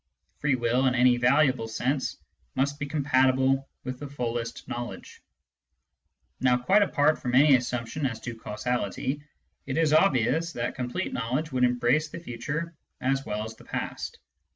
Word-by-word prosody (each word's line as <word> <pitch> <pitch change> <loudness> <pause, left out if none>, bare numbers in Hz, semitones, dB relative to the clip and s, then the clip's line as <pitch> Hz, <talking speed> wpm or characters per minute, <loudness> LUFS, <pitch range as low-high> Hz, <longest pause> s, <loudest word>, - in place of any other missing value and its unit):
Free 140 -2 +2
will 125 +2 +2
in 125 - +2
any 125 0 +5
valuable 130 -1 +3
sense 130 +5 -1 0.4
must 140 +2 0
be 145 - -3
compatible 135 -2 +2
with 130 -1 -5
the 145 - -6
fullest 120 -3 -4
knowledge. 120 0 -6 1.2
Now, 125 -1 +3
quite 190 +12 +4
apart 155 -6 +3
from 125 0 -1
any 140 +1 +7
assumption 125 +3 -1
as 115 -4 -5
to 120 - -5
causality, 120 +5 -2 0.5
it 135 +1 -2
is 160 -2 +3
obvious 155 0 +3
that 120 0 -2
complete 125 +9 -3
knowledge 130 +7 -2
would 130 -1 +1
embrace 125 +5 +2
the - - -7
future 150 +4 -4 0.3
as 135 +1 0
well 105 +1 -2
as 110 0 -8
the - - -16
past. - - -4
130 Hz, 155 wpm, -27 LUFS, 120-145 Hz, 1.2 s, any